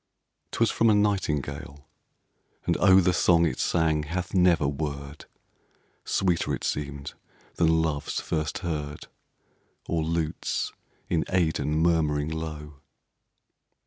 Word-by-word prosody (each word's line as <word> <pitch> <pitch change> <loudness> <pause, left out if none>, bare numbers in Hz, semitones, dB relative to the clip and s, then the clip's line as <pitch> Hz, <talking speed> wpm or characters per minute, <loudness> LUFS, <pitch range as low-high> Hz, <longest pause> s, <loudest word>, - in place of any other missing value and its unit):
'Twas 115 - +1
from 115 - +3
a 105 - +5
nightingale, 75 -8 -1 0.8
and - - +1
oh! 95 0 +7
The 90 -1 +3
song 85 -1 +4
it 80 - -2
sang 80 -2 +1
hath 85 +4 -4
never 90 -6 +4
word! 70 0 -5 0.8
Sweeter 90 -3 +1
it - - -10
seemed 70 -1 -3 0.4
than 80 -1 +3
Love's, 75 -2 -2
first 75 -2 -2
heard, 75 -3 -4 0.8
Or 85 -1 0
lutes 80 -1 -2 0.4
in 80 - +1
Aidenn 80 -4 +1
murmuring 75 -3 +1
low. 75 -3 -6
80 Hz, 110 wpm, -26 LUFS, 75-85 Hz, 0.8 s, oh